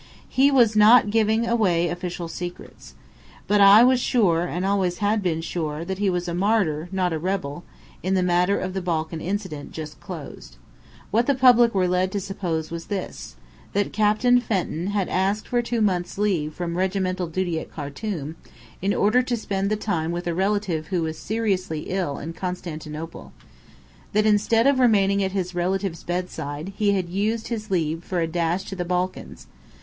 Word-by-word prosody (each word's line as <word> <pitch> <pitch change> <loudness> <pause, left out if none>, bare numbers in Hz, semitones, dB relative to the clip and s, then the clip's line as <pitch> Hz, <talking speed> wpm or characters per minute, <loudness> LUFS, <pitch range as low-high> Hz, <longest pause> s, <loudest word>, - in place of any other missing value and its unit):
He 270 +2 +4
was 240 -6 +4
not 215 0 +6
giving 220 +1 +2
away 185 -8 +2
official 175 0 -4
secrets, 175 +1 -8 0.5
but 205 0 +3
I 200 +3 +9
was 255 0 +4
sure 180 -9 +2
and 180 +2 -3
always 190 -3 +1
had 210 +1 +1
been 165 -4 -1
sure 160 -1 -3
that 190 +1 -4
he 205 -1 +2
was 180 -1 -2
a 170 - -2
martyr, 180 -4 +1
not 185 -3 0
a 160 - -2
rebel, 175 -3 -3 0.4
in 190 +2 0
the 185 - +2
matter 180 +2 +2
of 185 0 -3
the 190 - -2
Balkan 160 -2 -2
incident, 185 -6 -4
just 155 -1 -7
closed. - - -9 0.6
What 230 +3 +2
the 280 - +3
public 240 -3 +5
were 185 -1 +2
led 180 +1 +1
to 205 - 0
suppose 175 -5 -3
was 170 0 -5
this: 190 - -5 0.4
that 205 0 0
Captain 215 +4 +3
Fenton 185 -6 -2
had 200 -2 0
asked 195 +3 0
for 245 -1 +1
two 235 -1 -2
months' 180 -4 0
leave 175 -8 0
from 175 -1 -3
regimental 185 -1 -1
duty 175 0 -1
at - - -10
Khartum, 155 +1 -5 0.4
in 200 +2 +1
order 215 +5 +3
to 245 -1 -2
spend 195 -2 -2
the 215 - +1
time 170 -6 -2
with 175 +1 -4
a 170 - -1
relative 190 -4 -1
who 175 -1 -1
was 160 0 -4
seriously 190 -7 -1
ill 180 -7 -1
in 165 +3 -6
Constantinople. 165 -3 -6 0.8
That 210 +1 +3
instead 215 +2 +3
of 275 -1 +4
remaining 200 -5 +3
at 190 0 -2
his 185 -2 -2
relative's 180 0 -1
bedside, 175 -1 -4
he 205 -1 +2
had 185 -3 -1
used 215 +5 -1
his 215 -2 -4
leave 165 -3 -1
for 180 -1 -2
a 165 - +1
dash 170 +2 -1
to 195 - -7
the 180 - -2
Balkans. 180 +1 -3
185 Hz, 180 wpm, -24 LUFS, 170-210 Hz, 0.8 s, I